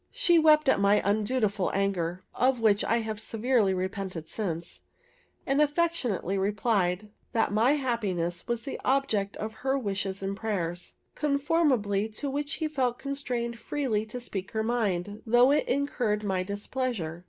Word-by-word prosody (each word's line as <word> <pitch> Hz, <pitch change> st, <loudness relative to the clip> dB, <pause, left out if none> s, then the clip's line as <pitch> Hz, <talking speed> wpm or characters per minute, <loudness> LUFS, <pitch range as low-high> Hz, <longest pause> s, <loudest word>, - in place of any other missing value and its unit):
She 370 Hz, -9 st, +3 dB
wept 305 Hz, -2 st, +5 dB
at 265 Hz, -, +4 dB
my 200 Hz, +1 st, +4 dB
undutiful 210 Hz, -1 st, +1 dB
anger, 185 Hz, -3 st, -1 dB
(of 255 Hz, 0 st, +2 dB
which 215 Hz, -2 st, +3 dB
I 230 Hz, +1 st, +1 dB
have 220 Hz, -1 st, -4 dB
severely 225 Hz, -2 st, +1 dB
repented 185 Hz, -3 st, -3 dB
since,) 170 Hz, -6 st, -4 dB, 0.6 s
and 275 Hz, +2 st, +2 dB
affectionately 290 Hz, -, 0 dB
replied, 205 Hz, -1 st, 0 dB, 0.2 s
that 225 Hz, -3 st, +1 dB
my 230 Hz, +6 st, +4 dB
happiness 200 Hz, -, -1 dB
was 235 Hz, -1 st, -2 dB
the 275 Hz, -, -5 dB
object 220 Hz, -7 st, +1 dB
of 215 Hz, +1 st, -4 dB
her 270 Hz, +1 st, +1 dB
wishes 195 Hz, -4 st, -3 dB
and 195 Hz, +1 st, -2 dB
prayers; 180 Hz, -5 st, -3 dB, 0.2 s
conformably 280 Hz, -, +1 dB
to 280 Hz, +5 st, -3 dB
which 290 Hz, +1 st, -2 dB
she 315 Hz, +2 st, -1 dB
felt 255 Hz, -5 st, 0 dB
constrained 245 Hz, -4 st, -3 dB
freely 250 Hz, -8 st, -1 dB
to 245 Hz, +3 st, -6 dB
speak 195 Hz, -5 st, -6 dB
her 220 Hz, 0 st, 0 dB
mind, 205 Hz, -4 st, -1 dB
though 245 Hz, +4 st, +6 dB
it 295 Hz, -, +2 dB
incurred 250 Hz, -6 st, 0 dB
my 190 Hz, -2 st, 0 dB
displeasure. 200 Hz, -3 st, -3 dB
220 Hz, 150 wpm, -28 LUFS, 195-265 Hz, 0.6 s, though